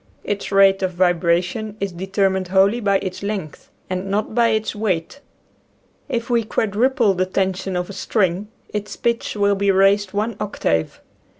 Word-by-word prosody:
Its 205 0 -3
rate 195 0 +5
of 185 -1 -1
vibration 180 +4 +1
is 200 -1 -2
de 180 +2 -6
termined 190 -1 +1
wholly 195 +5 +3
by 200 -3 +2
its 185 -1 -5
length 200 -7 -5 0.2
and 185 +1 -3
not 210 +2 -1
by 235 +1 +4
its 220 -1 0
weight. 205 +2 -2 0.9
If 235 -1 -2
we 235 -2 +2
quadruple 220 +1 +1
the 185 0 0
tension 190 0 -1
of 180 0 -1
a 200 - -8
string 195 -1 0 0.2
its 210 0 -5
pitch 235 -1 -1
will 200 -1 +2
be 200 0 0
raised 195 +1 +3
one 210 +1 -2
octave. 80 - -1
195 Hz, 165 wpm, -21 LUFS, 185-215 Hz, 0.9 s, rate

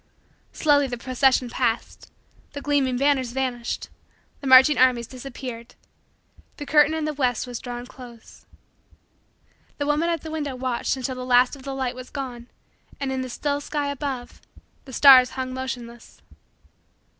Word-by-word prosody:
Slowly 290 -2 +2
the 245 -1 -5
procession 255 +1 +2
passed 240 -1 -3 0.4
the 285 - -6
gleaming 275 -4 +1
banners 265 -3 +1
vanished 250 -3 -3 0.5
the 275 - -6
marching 265 +3 +7
armies 250 -2 +4
disappeared 250 -2 -9 0.8
the 290 - -6
curtain 300 +1 +4
in 315 -1 -2
the 305 - -2
west 255 -5 0
was 245 -2 -6
drawn 245 -1 -7
close. 245 -3 -14 1.3
The 285 - -2
woman 300 +3 +1
at 335 -3 -1
the 320 - -8
window 290 -4 -3
watched 255 +1 -2
until 260 0 -3
the 255 0 -6
last 250 +1 +3
of 275 - -14
the 270 0 -6
light 260 -2 -2
was 255 0 -10
gone 250 -4 -7 0.5
and, 275 -2 -2
in 260 0 -2
the 255 - -5
still 285 +3 -2
sky 290 -1 -2
above, 270 -3 -6 0.4
the 265 - -11
stars 260 -1 +8
hung 255 0 -3
motionless. 245 -3 -7
260 Hz, 155 wpm, -24 LUFS, 245-285 Hz, 1.3 s, stars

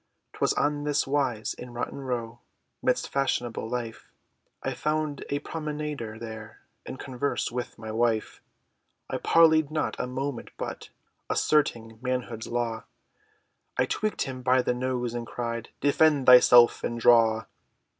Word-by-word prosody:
'Twas - - +1
on 145 0 0
this 145 -1 +1
wise, 135 -6 0
In 125 -1 -10
Rotten 120 +3 -4
Row, 120 -3 -4 0.4
Midst - - +1
fashionable 120 -5 -1
life, 120 -2 -5 0.5
I - - -1
found 155 -1 -2
a 145 - 0
promenader 150 -8 -5
there, 110 -1 -8 0.3
In 130 - -6
converse, 130 0 -2
with 125 +1 -5
my 110 -1 -7
wife! 115 -1 0 0.7
I - - -1
parleyed 160 -2 +4
not 155 0 -1
a - - -1
moment, 130 0 -4
but - - -6 0.4
Asserting 115 -7 +1
manhood's 125 -3 -3
law, 115 -2 -2 0.9
I - - +3
tweaked 215 -1 -1
him 130 -2 -6
by 125 +1 +3
the 125 - +1
nose, 125 -1 -2
and 120 -1 -4
cried, 115 -1 -4
"Defend 145 0 +3
thyself 125 -1 +7
and 120 - -2
draw!" 115 -1 +5
125 Hz, 135 wpm, -27 LUFS, 115-145 Hz, 0.9 s, thyself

